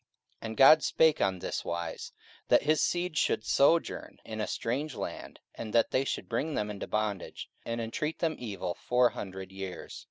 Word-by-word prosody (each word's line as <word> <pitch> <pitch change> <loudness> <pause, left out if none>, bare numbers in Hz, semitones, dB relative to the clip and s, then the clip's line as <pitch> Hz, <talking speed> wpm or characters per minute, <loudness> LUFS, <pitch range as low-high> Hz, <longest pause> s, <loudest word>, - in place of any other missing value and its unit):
44:007:006 - - -9
And 110 - -6
God 155 +4 +8
spake 160 -2 +3
on 95 -1 +2
this - - -4
wise, 85 -1 -4 0.4
That - - +5
his 155 +1 +3
seed 175 -3 0
should 110 - +1
sojourn 160 +7 +2
in 110 -1 -5
a - - -1
strange 135 +4 -2
land; - - -6
and 110 -2 -7
that 115 - +3
they 130 +1 +2
should - - -3
bring 140 +7 -1
them 105 0 -1
into 100 - -6
bondage, 105 -3 -3 0.2
and 115 0 -2
entreat 150 +8 -2
them 160 -2 0
evil 100 -6 -4
four 125 +4 +2
hundred 95 -1 -7
years. 95 -1 -7
115 Hz, 185 wpm, -30 LUFS, 100-150 Hz, 0.4 s, God